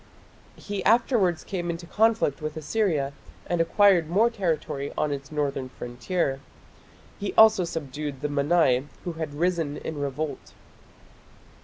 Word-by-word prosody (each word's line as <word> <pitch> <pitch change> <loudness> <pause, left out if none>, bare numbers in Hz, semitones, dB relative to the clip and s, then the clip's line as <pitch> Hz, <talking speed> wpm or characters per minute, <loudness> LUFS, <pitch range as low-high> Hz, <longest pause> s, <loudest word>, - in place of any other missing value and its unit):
He 205 -2 -5
afterwards 220 -7 +3
came 175 -3 -4
into 170 +1 -4
conflict 220 -7 +1
with 155 0 -4
Assyria, 155 -5 0 0.3
and 175 -1 0
acquired 180 -2 +4
more 220 +7 +3
territory 160 -8 -2
on 150 - 0
its 140 0 -5
northern 140 -3 -2
frontier. 135 +4 -2 0.8
He 200 - -4
also 220 -4 +7
subdued 145 -3 -5
the 150 - 0
Mannai, 145 -2 +2 0.2
who 175 - -4
had 160 -3 -5
risen 165 -3 0
in 155 -2 -5
revolt. 145 0 -4
160 Hz, 130 wpm, -26 LUFS, 145-185 Hz, 0.8 s, also